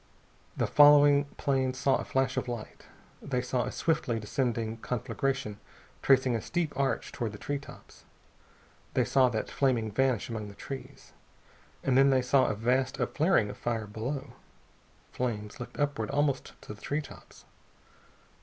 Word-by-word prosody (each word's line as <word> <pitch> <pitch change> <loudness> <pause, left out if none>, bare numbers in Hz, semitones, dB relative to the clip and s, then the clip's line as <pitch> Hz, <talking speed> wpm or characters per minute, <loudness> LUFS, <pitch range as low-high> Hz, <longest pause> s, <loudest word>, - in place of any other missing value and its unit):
The - - +1
following 145 -1 +7
planes 130 -2 0
saw 135 0 +2
a - - -4
flash 135 0 0
of - - -2
light. 120 -3 -7 0.3
They 125 -3 -2
saw 125 0 -1
a - - -4
swiftly 145 -8 0
descending 115 0 -2
conflagration 120 -2 -2 0.4
tracing 130 -2 +4
a 115 - -2
steep 170 +2 -2
arch 135 -3 -1
toward 115 -5 -4
the - - -7
tree 145 +6 -3
tops. 140 - -14 0.9
They - - +3
saw 130 -2 +4
that 110 -2 -3
flaming 120 -6 +1
vanish 130 0 +1
among 110 -3 -5
the 100 - -11
trees. 135 +5 -9 0.7
And 130 - +2
then 135 +1 +6
they 130 -2 +3
saw 130 +1 +3
a - - -1
vast 130 +4 0
upflaring 150 - +2
of - - -11
fire 115 -2 -2
below. 125 +5 -5 0.8
Flames 105 -4 -3
licked 120 - -8
upward 145 -7 -1
almost 140 -1 -1
to - - -8
the 105 - -16
tree 145 +2 -1
tops.... 150 - -14
130 Hz, 155 wpm, -29 LUFS, 115-140 Hz, 0.9 s, following